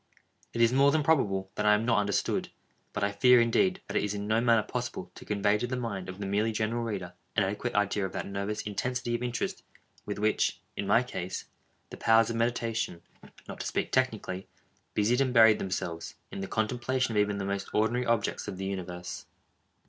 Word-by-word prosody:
It 115 - -2
is 115 +1 +5
more 140 +2 +5
than 155 +1 +2
probable 100 -11 +1
that 105 - -2
I 105 - +7
am 110 +2 -1
not 115 -3 +3
understood; 100 -1 0 0.4
but 105 - -3
I 100 - +2
fear, 125 +5 +6
indeed, 185 +12 +2
that - - -6
it - - +2
is 105 0 -1
in 100 0 -4
no 110 +2 +2
manner 115 -2 +4
possible - - -4
to - - -12
convey 105 0 +2
to 120 - -1
the 130 - -2
mind 100 -7 -4
of 95 - -7
the 100 - -4
merely 105 +3 +1
general 110 +2 -1
reader, 95 -6 -4 0.2
an 105 - +4
adequate 105 +5 -2
idea 100 -1 +1
of - - -11
that - - -3
nervous 100 +2 -3
intensity 120 +3 -2
of 120 - -1
interest 125 -1 -2 0.4
with 105 - -4
which, 105 +1 +1 0.2
in 100 - -3
my 115 +5 +5
case, 95 -7 -5 0.5
the - - -7
powers 115 0 +4
of - - -3
meditation 115 -6 -1 0.4
(not - - -8
to - - -3
speak - - -2
technically) 110 -7 0 0.5
busied 115 +5 +3
and 130 -2 0
buried 110 -2 +7
themselves, 85 -3 -4 0.2
in - - -6
the 95 - -3
contemplation 120 +4 0
of - - +4
even 105 0 0
the 100 - -3
most 100 0 -3
ordinary 115 +3 +1
objects 115 -3 0
of 100 -2 -5
the 95 - -4
universe. 90 -2 -5
105 Hz, 210 wpm, -29 LUFS, 100-120 Hz, 0.5 s, I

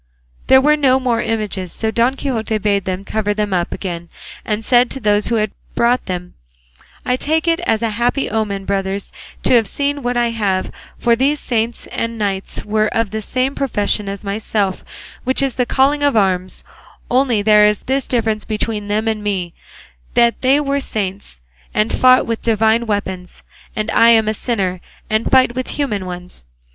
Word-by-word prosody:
There 265 0 +7
were 300 +2 +4
no 265 -3 +3
more 245 -3 0
images, 210 -5 -2
so 220 0 -2
Don 235 +4 +2
Quixote 225 -6 -2
bade 200 -2 0
them 185 +1 -3
cover 210 -1 -1
them 210 -2 -1
up 175 -1 0
again, 170 -3 -5 0.3
and 215 0 -3
said 245 0 +4
to 270 - -6
those 210 -2 +1
who 235 - 0
had 215 -2 0 0.2
brought 240 +2 +2
them, 180 -1 -5 0.7
"I 250 - +2
take 315 +5 0
it 335 0 +2
as 225 +1 +1
a 225 - 0
happy 240 +5 0
omen, 205 -3 -2
brothers, 195 0 -2 0.3
to - - +3
have 230 -4 +4
seen 285 +3 -2
what 245 -1 -1
I 240 -1 +2
have; 200 -5 -1 0.3
for 235 -1 +3
these 280 +5 +1
saints 235 -1 -2
and 230 0 -3
knights 195 -2 -3
were 215 0 +1
of 225 -2 -1
the 220 0 -3
same 255 +5 -1
profession 210 -7 0
as 200 0 -6
myself, 200 -1 -2 0.4
which 260 +2 +1
is 270 -2 0
the 250 -1 -1
calling 280 +2 +2
of 285 -5 +2
arms; 185 -2 0 0.5
only 250 -4 +2
there 210 0 +6
is 210 0 +1
this 270 0 -1
difference 220 -3 0
between 215 -1 -3
them 215 +2 -1
and 220 -1 -1
me, 185 -5 -2 0.6
that 235 -1 +3
they 270 +2 +4
were 280 -1 0
saints, 195 - -5 0.3
and 215 +1 +1
fought 255 0 +5
with 230 -1 -3
divine 225 +1 +2
weapons, 190 -4 -4 0.3
and 215 +1 -2
I 230 - +5
am 225 -2 +5
a 215 - +1
sinner 195 -6 -2 0.3
and 215 +1 +1
fight 260 -2 +4
with 255 +1 -3
human 210 -10 -2
ones. 180 - -8
220 Hz, 185 wpm, -18 LUFS, 205-250 Hz, 0.7 s, There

